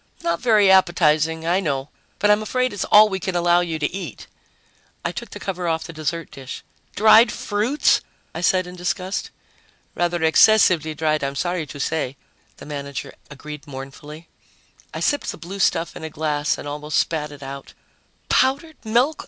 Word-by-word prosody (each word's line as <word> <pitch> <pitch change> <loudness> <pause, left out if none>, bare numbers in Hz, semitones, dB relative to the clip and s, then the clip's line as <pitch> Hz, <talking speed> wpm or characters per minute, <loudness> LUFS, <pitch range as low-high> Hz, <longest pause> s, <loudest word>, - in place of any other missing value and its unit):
"Not 170 0 0
very 215 -5 +4
appetizing. 160 -3 +3
I 175 +3 +2
know, 140 -6 -2 0.3
but 210 - +3
I'm 210 +1 +3
afraid 255 +2 -1
it's 205 - -2
all 215 +1 +7
we 190 -2 -3
can 190 0 -3
allow 175 0 +3
you 170 -2 -2
to 150 0 -2
eat." 180 - -7 0.8
I - - 0
took - - -7
the - - -9
cover 180 -2 -4
off 160 -1 0
the 165 - -9
dessert 155 +1 -4
dish. 130 -1 -8 0.3
"Dried 220 +2 +6
fruits!" 220 +8 +1 0.3
I 165 - -5
said 185 +1 +2
in 180 0 -9
disgust. 180 +2 -3 0.6
"Rather 175 -1 -1
excessively 160 -2 +4
dried, 155 -1 0
I'm 140 0 -2
sorry 175 +1 -2
to 145 - -9
say," 140 -3 -2 0.4
the - - -11
manager 140 -2 -6 0.2
agreed 150 +1 -10
mournfully. 145 +4 -9 0.6
I - - -6
sipped 290 - 0
the - - -10
blue 190 +4 -8
stuff 170 -3 +1
in - - -9
a 160 - -4
glass 150 -1 -1
and - - -8
almost 150 +1 -3
spat 150 -2 0
it 145 -1 -11
out. 135 0 -9 0.5
"Powdered 285 +5 +1
milk! 245 +8 +1
170 Hz, 175 wpm, -22 LUFS, 150-195 Hz, 0.8 s, all